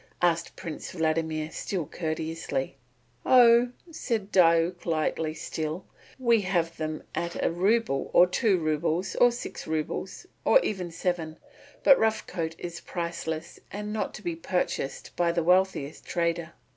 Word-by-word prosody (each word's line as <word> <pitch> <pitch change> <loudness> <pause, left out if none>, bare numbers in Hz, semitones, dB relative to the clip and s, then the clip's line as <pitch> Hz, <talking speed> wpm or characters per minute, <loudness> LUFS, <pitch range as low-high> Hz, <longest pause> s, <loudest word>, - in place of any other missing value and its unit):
asked 170 -1 +1
Prince 160 -3 -6
Vladimir 160 -2 -1
still 180 -2 -3
courteously. 160 -4 -3 0.5
"Oh," 240 -1 +6 0.2
said 225 -10 -3
Diuk 170 -1 +3
lightly 155 -1 0
still, 160 +3 -4 0.3
"we 235 -4 +3
have 170 -3 -1
them 155 -1 -4
at 170 0 -3
a - - +2
rouble, 195 -3 +1
or 175 - +7
two 195 +2 +2
roubles, 160 +3 0
or 245 0 +6
six 240 - -7
roubles, 160 - -3 0.2
or - - +6
even 185 - -3
seven, 165 -2 -2 0.5
but 275 - +7
Rough 220 -1 +1
Coat 165 -1 -4
is 175 0 -6
priceless 170 -2 -4
and 210 +1 -5
not 215 - -2
to 215 - -10
be 170 -2 -2
purchased 165 -4 -3
by 175 -1 +2
the 170 0 0
wealthiest 180 -4 +2
trader." 170 -1 -1
170 Hz, 140 wpm, -27 LUFS, 160-195 Hz, 0.5 s, or